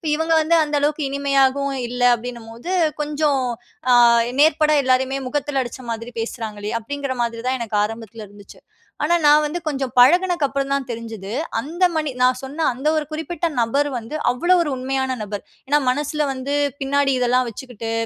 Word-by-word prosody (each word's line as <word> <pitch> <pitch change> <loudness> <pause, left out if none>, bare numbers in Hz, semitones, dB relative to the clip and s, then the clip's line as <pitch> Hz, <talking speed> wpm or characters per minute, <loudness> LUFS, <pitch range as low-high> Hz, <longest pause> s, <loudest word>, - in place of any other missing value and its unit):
இவங்க 320 +1 0
வந்து, 320 +2 +2
அந்த 295 -1 -2
அளவுக்கு 300 +1 0
இனிமையாகவும் 275 0 +1
இல்ல, 245 +1 -5
அப்படின்னம்போது, 235 +5 -8 0.3
கொஞ்சம் 295 -2 0 0.5
அ, - - +7 0.5
நேர்பட 305 0 +4
எல்லாரையுமே, 260 +1 +1
முகத்தில 280 0 -1
அடிச்ச 245 +1 -8
மாதிரி 230 +1 -5
பேசுறாங்களே! 215 -3 -5
அப்படிங்கிற 275 +3 -4
மாதிரி 230 -1 -2
தான், 260 +1 +1
எனக்கு 220 -3 -2
ஆரம்பத்தில 225 0 -6
இருந்துச்சு. 205 0 -15 0.4
ஆனா, 335 +3 +3
நான் 300 +1 +6
வந்து 305 +4 -3
கொஞ்சம் 270 -4 -2
பழகினக்க 345 +4 +5
அப்புறம் 275 0 -3
தான் 275 -2 -1
தெரிஞ்சது, 225 -4 -6 0.3
அந்த 325 +9 -3
மனி 305 -2 -1
நான் 255 0 +3
சொன்ன 295 +4 -3
அந்த 270 +5 -4
ஒரு 310 -1 0
குறிப்பிட்ட 335 +2 -3
நபர் 280 +6 +1
வந்து, 230 +6 -8 0.2
அவ்வளோ 345 +9 +2
ஒரு 325 - -1
உண்மையான 265 0 -1
நபர். 205 -1 -6 0.2
ஏனா, 295 +2 +3
மனசுல 295 +3 -1
வந்து 265 +2 -4 0.3
பின்னாடி 275 0 +1
இதெல்லாம் 250 0 +2
வச்சுக்கிட்டு, 230 -1 -7
270 Hz, 160 wpm, -21 LUFS, 235-295 Hz, 0.5 s, அ